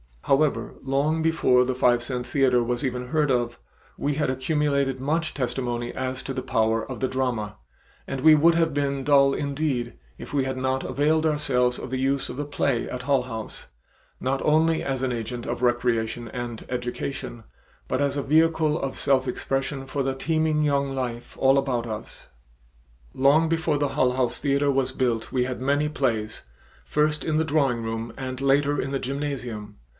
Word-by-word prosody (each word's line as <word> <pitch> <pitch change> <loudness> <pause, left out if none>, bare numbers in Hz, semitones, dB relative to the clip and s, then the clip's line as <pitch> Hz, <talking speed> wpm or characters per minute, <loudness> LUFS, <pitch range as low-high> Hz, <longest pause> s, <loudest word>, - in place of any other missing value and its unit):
However, 140 +2 +1
long 140 +4 +1
before 145 -6 +3
the 130 0 -1
five 120 -1 +3
cent 125 0 -3
theater 125 -1 +2
was 120 +4 -2
even 125 -1 -3
heard 150 +2 +1
of, 120 -2 0 0.4
we 145 0 -1
had 150 -2 0
accumulated 140 0 0
much 155 +4 -1
testimony 120 -2 -2
as 130 0 -3
to 135 - -4
the 130 - -3
power 115 -1 0
of 130 - -5
the 130 - +1
drama, 125 -5 -2 0.5
and 135 -1 -4
we 155 +2 +8
would 165 +3 +5
have 165 -2 +2
been 140 -1 -1
dull 140 0 +5
indeed 140 -4 -2 0.2
if - - -10
we 140 -2 +2
had 130 0 -3
not 130 0 -1
availed 155 +2 +1
ourselves 130 -5 +1
of - - -7
the 130 +1 -2
use 135 +1 0
of 125 - -6
the 145 - -2
play 140 -4 -1
at 125 0 -5
Hull 135 -1 +2
House, 110 -3 -7 0.5
not 135 +1 -1
only 160 +1 +3
as 135 -1 -2
an 130 - 0
agent 120 +1 -4
of 120 0 -3
recreation 120 -1 0
and 120 -1 -6
education, 125 -1 -4 0.4
but 130 - -1
as 140 -1 +1
a 140 - -1
vehicle 160 +1 +3
of 135 -1 -4
self 135 -2 +2
expression 135 +2 -2
for 140 +1 -3
the 135 0 -1
teeming 155 +1 +1
young 140 -2 +1
life 120 -2 -4
all 135 +1 +5
about 130 -4 0
us. 110 -2 -7 0.8
Long 145 +5 +4
before 160 -2 +1
the 145 -1 0
Hull 125 -1 +2
House 125 -2 0
theater 140 0 +2
was 135 -1 +1
built 120 -4 -1
we 125 -1 +1
had 125 0 -4
many 145 +3 +1
plays, 115 -7 -1 0.4
first 150 0 +1
in 155 -1 0
the 160 - +3
drawing 140 -7 +1
room 115 +1 -4
and 130 -1 -5
later 140 +1 +2
in 135 - -2
the 135 - -1
gymnasium. 125 -7 -4
135 Hz, 180 wpm, -25 LUFS, 125-145 Hz, 0.8 s, we